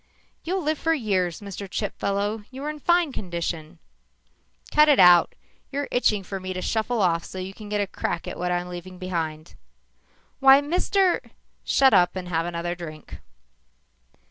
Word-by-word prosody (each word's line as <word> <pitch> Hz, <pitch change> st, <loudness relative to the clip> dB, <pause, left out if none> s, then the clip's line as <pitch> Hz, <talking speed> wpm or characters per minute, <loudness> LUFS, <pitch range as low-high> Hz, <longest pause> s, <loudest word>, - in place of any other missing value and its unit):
"You'll 370 Hz, +2 st, -2 dB
live 310 Hz, 0 st, -1 dB
for 325 Hz, 0 st, +1 dB
years, 190 Hz, -, -1 dB
Mr. 200 Hz, -1 st, -7 dB
Chipfellow. 205 Hz, +1 st, -2 dB
You're 275 Hz, +3 st, -5 dB
in 305 Hz, -, -10 dB
fine 345 Hz, 0 st, +2 dB
condition." 170 Hz, -7 st, -5 dB, 0.9 s
"Cut 300 Hz, 0 st, +5 dB
it 290 Hz, -, +5 dB
out. 180 Hz, -2 st, +7 dB, 0.4 s
You're 285 Hz, +1 st, -2 dB
itching 210 Hz, -5 st, +2 dB
for 195 Hz, +1 st, -5 dB
me 185 Hz, 0 st, -5 dB
to 185 Hz, -, -4 dB
shuffle 220 Hz, 0 st, 0 dB
off 170 Hz, -2 st, +1 dB
so -, -, -9 dB
you 185 Hz, +1 st, -5 dB
can 210 Hz, 0 st, -11 dB
get 210 Hz, 0 st, 0 dB
a -, -, +1 dB
crack 175 Hz, -3 st, -4 dB
at -, -, -6 dB
what 180 Hz, 0 st, -1 dB
I'm 175 Hz, 0 st, -1 dB
leaving 180 Hz, +1 st, -8 dB
behind." 165 Hz, -3 st, -4 dB, 0.9 s
"Why, 270 Hz, 0 st, +8 dB
Mr. 360 Hz, +5 st, +1 dB, 0.3 s
" -, -, -44 dB
"Shut 270 Hz, -1 st, +4 dB
up 175 Hz, +1 st, +4 dB
and 180 Hz, -1 st, -5 dB
have 165 Hz, -1 st, -1 dB
another 175 Hz, 0 st, -3 dB
drink." 155 Hz, -4 st, -9 dB
195 Hz, 170 wpm, -24 LUFS, 175-270 Hz, 0.9 s, Why